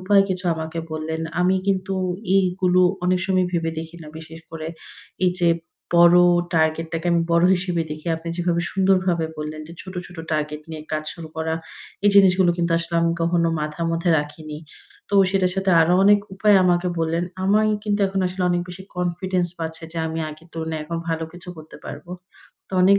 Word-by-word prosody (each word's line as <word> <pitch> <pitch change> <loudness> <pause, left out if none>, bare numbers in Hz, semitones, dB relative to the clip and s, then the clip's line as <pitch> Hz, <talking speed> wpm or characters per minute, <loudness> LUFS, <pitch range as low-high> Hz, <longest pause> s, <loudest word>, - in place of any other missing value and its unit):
উপায়ে 195 +1 +4
কিছু 185 0 -3
আমাকে 160 +1 -5
বললেন। 155 +1 -3 0.2
আমি 185 +1 +3
কিন্তু 195 0 0 0.4
এইগুলো 185 -1 +2 0.2
অনেক 180 0 +2
সময় 185 -2 +2
ভেবে 165 -2 0
দেখি 165 +1 -7
না 155 - -10
বিশেষ 160 0 -10
করে, 160 -1 -6 0.6
এই 180 - +3
যে 170 - +4 0.5
বড় 170 +1 +7 0.4
target 160 +1 +2
টাকে 165 +2 -3
আমি 170 - +3
বড় 170 +1 +4
হিসেবে 180 -2 -1
দেখি। 155 +2 -7
আপনি 165 +1 -8
যেভাবে 170 -1 0
সুন্দরভাবে 185 -3 +2
বললেন 150 0 -5
যে - - -9
ছোট, 185 0 -10
ছোট 175 - -13 0.2
target 150 0 -2
নিয়ে 155 -1 -6
কাজ 155 0 -1
শুরু 165 -1 -9
করা। 160 0 -1 0.5
এই 205 - +6
জিনিসগুলো 190 -2 +6
কিন্তু 170 -1 0
আসলে 170 0 -4
আমি 165 0 +2
কখনো 170 0 +2
মাথার 150 +2 -3
মধ্যে 165 +1 0
রাখিনি। 150 +1 -6 0.5
তো 205 - -3 0.2
সেটার 185 -2 +2
সাথে 190 0 +1
আরও 170 +2 +4
অনেক 205 0 +6
উপায় 205 +1 +4
আমাকে 175 0 +2
বললেন। 165 +2 0 0.2
আমায় 215 +2 +3
কিন্তু 205 -1 0
এখন 195 0 -2
আসলে 180 +1 -3
অনেক 175 0 +1
বেশি 180 +1 -8
confidence 180 0 -1
পাচ্ছে 160 0 -5
যে, 165 - -4
আমি 160 0 -4
আগের 155 +2 -12
তুলনায় 160 -1 -4
এখন 165 +2 -4
ভালো 160 0 -1
কিছু 175 +1 -10
করতে 155 0 -12
পারব। 145 - -8 0.6
তো - - -21
অনেক 200 +2 +6
170 Hz, 185 wpm, -22 LUFS, 160-185 Hz, 0.6 s, বড়